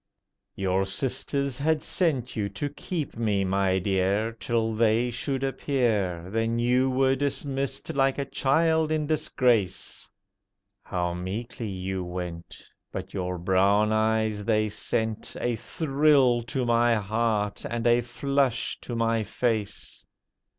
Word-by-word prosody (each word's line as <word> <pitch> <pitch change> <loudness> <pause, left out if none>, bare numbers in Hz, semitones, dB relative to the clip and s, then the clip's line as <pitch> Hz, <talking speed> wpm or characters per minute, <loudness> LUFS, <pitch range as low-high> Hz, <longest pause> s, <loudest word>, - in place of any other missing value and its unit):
Your 95 0 +1
sisters 135 +5 -1
had 155 +1 +1
sent 135 -9 0
you 105 -3 -1
to 100 +9 -4
keep 150 +1 -5
me, 105 -4 +1
my 95 0 +1
dear, 100 +3 +1
Till 115 0 -1
they 115 +2 +2
should 135 +3 -2
appear. 115 - 0
Then 115 +1 0
you 125 +2 +2
were 130 +1 +3
dismissed 140 0 -2
like 135 -1 +2
a 140 - -1
child 160 +4 +2
in 155 -1 +1
disgrace. 125 - 0 0.7
How 90 -2 -2
meekly 105 +5 -5
you 95 0 -3
went! 90 -1 -6 0.3
But 95 0 -6
your 90 -2 -2
brown 100 +4 +3
eyes, 110 -1 +1
they 110 -1 +1
sent 110 +1 -2
A 120 -1 0
thrill 135 -1 +2
to 130 -2 -1
my 120 0 +3
heart, 105 0 -1
and 120 0 -3
a 120 0 +5
flush 135 +1 0
to 120 - -5
my 115 -1 +1
face. 110 -1 -2
115 Hz, 130 wpm, -26 LUFS, 100-135 Hz, 0.7 s, a